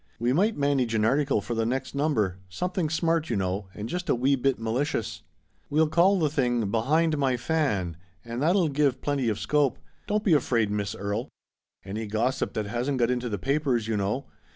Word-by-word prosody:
We 120 Hz, +2 st, +1 dB
might 205 Hz, +9 st, +2 dB
manage 140 Hz, -5 st, +1 dB
an 110 Hz, -1 st, +2 dB
article 135 Hz, -2 st, +2 dB
for 120 Hz, -, -4 dB
the 115 Hz, -1 st, 0 dB
next 130 Hz, +3 st, -2 dB
number 115 Hz, -, 0 dB
— 95 Hz, -, -29 dB
something, 180 Hz, -3 st, -1 dB
smart, 165 Hz, 0 st, 0 dB
you -, -, 0 dB
know, 95 Hz, +1 st, -2 dB
and 105 Hz, +1 st, -5 dB
just 180 Hz, +6 st, -4 dB
a -, -, +4 dB
wee 135 Hz, +3 st, +2 dB
bit 135 Hz, 0 st, +1 dB
mali 115 Hz, +4 st, 0 dB
cious. 145 Hz, -7 st, -3 dB, 0.5 s
We'll 155 Hz, +1 st, +3 dB
call 185 Hz, +5 st, +4 dB
the 160 Hz, -4 st, +2 dB
thing 125 Hz, -5 st, +1 dB
i -, -, -1 dB
Behind 150 Hz, +9 st, +1 dB
My 130 Hz, -3 st, +2 dB
Fan,' 115 Hz, -, -1 dB, 0.3 s
and 115 Hz, +2 st, -4 dB
that'll 170 Hz, +1 st, +3 dB
give 140 Hz, -2 st, +1 dB
plenty 140 Hz, -5 st, 0 dB
of 105 Hz, -, -1 dB
scope. 140 Hz, -1 st, +1 dB, 0.3 s
Don't 210 Hz, 0 st, 0 dB
be 190 Hz, -, +3 dB
afraid, 115 Hz, -8 st, +2 dB
Miss 105 Hz, -1 st, -2 dB
Erie. 105 Hz, +5 st, -3 dB, 0.6 s
Any 105 Hz, +3 st, -4 dB
gossip 115 Hz, +5 st, -1 dB
that 110 Hz, -, -2 dB
hasn't 120 Hz, +6 st, -1 dB
got 120 Hz, 0 st, +2 dB
into 125 Hz, -1 st, -1 dB
the 105 Hz, -, -2 dB
papers, 135 Hz, -4 st, 0 dB
you 110 Hz, -, 0 dB
know." 105 Hz, +7 st, -1 dB
130 Hz, 205 wpm, -27 LUFS, 110-150 Hz, 0.6 s, a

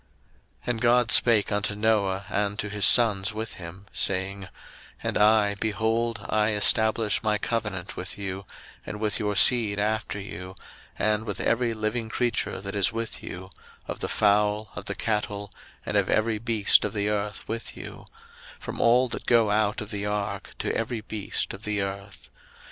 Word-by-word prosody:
01:009:008 -, -, -20 dB
And 115 Hz, -2 st, -4 dB
God 120 Hz, 0 st, +3 dB
spake 115 Hz, -4 st, +5 dB
unto 105 Hz, 0 st, -1 dB
Noah, 100 Hz, -3 st, +1 dB
and 105 Hz, 0 st, -1 dB
to 105 Hz, -, -3 dB
his 100 Hz, -1 st, +2 dB
sons 105 Hz, -3 st, +5 dB
with 110 Hz, 0 st, -5 dB
him, 90 Hz, +3 st, -10 dB
saying, 95 Hz, +1 st, -1 dB
01:009:009 -, -, -14 dB, 0.5 s
And -, -, -1 dB
I, 105 Hz, -1 st, +4 dB
behold, 110 Hz, +3 st, -1 dB
I 105 Hz, 0 st, +1 dB
establish 110 Hz, +1 st, +3 dB
my 105 Hz, -1 st, +1 dB
covenant 105 Hz, -5 st, -3 dB
with 95 Hz, -, -6 dB
you, 95 Hz, -1 st, -5 dB, 0.4 s
and 105 Hz, -, -7 dB
with 105 Hz, -1 st, 0 dB
your 105 Hz, -1 st, -1 dB
seed 110 Hz, -1 st, +5 dB
after 105 Hz, 0 st, -1 dB
you; 95 Hz, -1 st, -8 dB, 0.4 s
01:009:010 110 Hz, -, +2 dB
And 105 Hz, +1 st, -3 dB
with 105 Hz, -3 st, -5 dB
every 115 Hz, -1 st, +1 dB
living 110 Hz, +1 st, -3 dB
creature 120 Hz, 0 st, -1 dB
that 100 Hz, 0 st, -6 dB
is 100 Hz, -3 st, +2 dB
with 115 Hz, 0 st, -5 dB
you, 95 Hz, +1 st, -9 dB, 0.4 s
of -, -, -5 dB
the -, -, -3 dB
fowl, 105 Hz, 0 st, +1 dB
of -, -, -7 dB
the -, -, -3 dB
cattle, 105 Hz, -2 st, -2 dB, 0.3 s
and -, -, -3 dB
of -, -, +2 dB
every 110 Hz, 0 st, +1 dB
beast 110 Hz, -2 st, +4 dB
of 105 Hz, -, -3 dB
the 100 Hz, 0 st, 0 dB
earth 105 Hz, -1 st, -3 dB
with 115 Hz, 0 st, -5 dB
you; -, -, -9 dB, 0.5 s
from -, -, -6 dB
all 125 Hz, +2 st, +4 dB
that -, -, -6 dB
go 115 Hz, -3 st, +4 dB
out 105 Hz, 0 st, +1 dB
of 105 Hz, +1 st, -7 dB
the 100 Hz, -1 st, -3 dB
ark, 105 Hz, -1 st, -4 dB
to -, -, -2 dB
every 115 Hz, 0 st, -2 dB
beast 105 Hz, -1 st, -2 dB
of 100 Hz, -, -9 dB
the 105 Hz, -2 st, -1 dB
earth. 100 Hz, 0 st, -8 dB
105 Hz, 180 wpm, -26 LUFS, 100-110 Hz, 0.5 s, spake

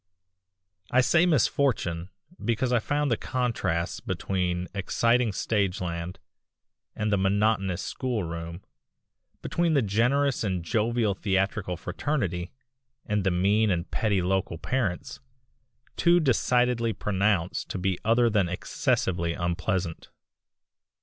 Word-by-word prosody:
I 130 Hz, -, +4 dB
say 170 Hz, +7 st, +4 dB
misfortune 115 Hz, -, +1 dB, 0.3 s
because 120 Hz, +2 st, 0 dB
I 120 Hz, -, +4 dB
found 145 Hz, +4 st, 0 dB
the 115 Hz, -, +2 dB
contrasts 115 Hz, -9 st, -1 dB
between 90 Hz, -2 st, -2 dB
exciting 115 Hz, +4 st, +2 dB
stageland 90 Hz, -4 st, -2 dB, 0.8 s
and 110 Hz, -1 st, -1 dB
the 100 Hz, -, +3 dB
monotonous 95 Hz, -2 st, +1 dB
schoolroom, 85 Hz, -8 st, -4 dB, 0.8 s
between 170 Hz, -2 st, +1 dB
the 140 Hz, -, +3 dB
generous 125 Hz, +7 st, +1 dB
and 95 Hz, -5 st, -1 dB
jovial 110 Hz, +2 st, +1 dB
theatrical 95 Hz, -1 st, -1 dB
fraternity 90 Hz, -, -2 dB, 0.5 s
and 105 Hz, -1 st, 0 dB
the 95 Hz, -, +2 dB
mean 100 Hz, +5 st, +2 dB
and 90 Hz, -2 st, -1 dB
petty 100 Hz, -4 st, +1 dB
local 95 Hz, -2 st, 0 dB
parents, 125 Hz, +3 st, -2 dB, 0.8 s
too 175 Hz, 0 st, +5 dB
decidedly 125 Hz, -4 st, +2 dB
pronounced 100 Hz, -3 st, 0 dB
to -, -, -3 dB
be 95 Hz, -1 st, -1 dB
other 115 Hz, +2 st, +4 dB
than 105 Hz, -6 st, +2 dB
excessively 85 Hz, -1 st, 0 dB
unpleasant. 85 Hz, 0 st, -2 dB
100 Hz, 110 wpm, -27 LUFS, 90-120 Hz, 0.8 s, too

